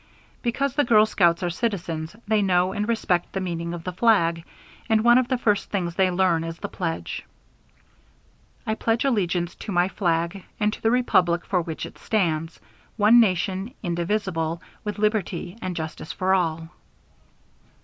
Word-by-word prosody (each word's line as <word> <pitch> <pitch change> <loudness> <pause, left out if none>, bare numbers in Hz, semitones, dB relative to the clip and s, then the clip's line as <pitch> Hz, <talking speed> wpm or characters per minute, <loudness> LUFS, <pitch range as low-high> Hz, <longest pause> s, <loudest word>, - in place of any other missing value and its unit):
Because 265 +2 -1
the 290 - +2
girl 215 -4 +5
scouts 175 -4 +2
are 175 - 0
citizens 170 -5 -3
they 215 -1 +3
know 185 -1 +2
and 210 0 -2
respect 180 -6 0
the 190 - -1
meaning 170 -2 -3
of 170 - -8
the 180 - -4
flag, 170 -6 +3 0.5
and 220 -1 +3
one 240 +1 +6
of 255 - 0
the 255 - 0
first 210 -4 +1
things 175 -4 -2
they 190 +1 +2
learn 175 -2 +2
is 165 0 -5
the - - -5
pledge: 165 -3 -4 1.4
"I 220 - 0
pledge 225 +3 0
allegiance 180 -8 0
to - - -7
my 175 0 +3
flag, 170 -1 -1 0.2
and 210 0 +1
to - - -9
the 225 - +2
Republic 180 -8 +2
for 185 -2 +1
which 165 -2 -5
it - - -12
stands; 165 -6 -1 0.4
one 220 +3 +6
Nation 190 +1 +1
indivisible, 170 -2 -1 0.2
with 210 -1 -4
liberty 205 -4 -1
and 185 -1 -3
justice 160 -1 -5
for 185 +1 0
all." 165 -3 0
185 Hz, 165 wpm, -24 LUFS, 170-215 Hz, 1.4 s, one